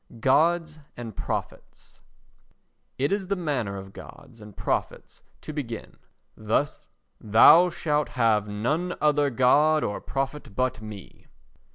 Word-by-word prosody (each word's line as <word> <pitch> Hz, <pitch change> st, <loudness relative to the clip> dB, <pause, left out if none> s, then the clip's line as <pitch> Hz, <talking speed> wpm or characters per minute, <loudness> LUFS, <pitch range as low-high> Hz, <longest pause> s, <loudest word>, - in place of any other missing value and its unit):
Gods 155 Hz, +5 st, +2 dB, 0.2 s
and 115 Hz, -4 st, -7 dB
Prophets -, -, -7 dB, 1.0 s
It 140 Hz, +2 st, 0 dB
is 200 Hz, -2 st, -1 dB
the 200 Hz, -, 0 dB
manner 135 Hz, -, -2 dB
of 95 Hz, 0 st, -10 dB
gods 115 Hz, -4 st, -13 dB
and 105 Hz, -1 st, -13 dB
prophets -, -, -3 dB, 0.2 s
to 155 Hz, -, -8 dB
begin: 120 Hz, -7 st, -6 dB, 0.4 s
"Thou 115 Hz, -, +3 dB
shalt 150 Hz, -5 st, -1 dB
have 115 Hz, -4 st, +1 dB
none 150 Hz, +13 st, -2 dB
other 145 Hz, -1 st, +2 dB
God 145 Hz, +5 st, +3 dB
or 105 Hz, -, -3 dB
Prophet 135 Hz, -5 st, -4 dB
but 130 Hz, -2 st, -1 dB
me." 105 Hz, -3 st, -11 dB
135 Hz, 120 wpm, -25 LUFS, 110-155 Hz, 1.0 s, Thou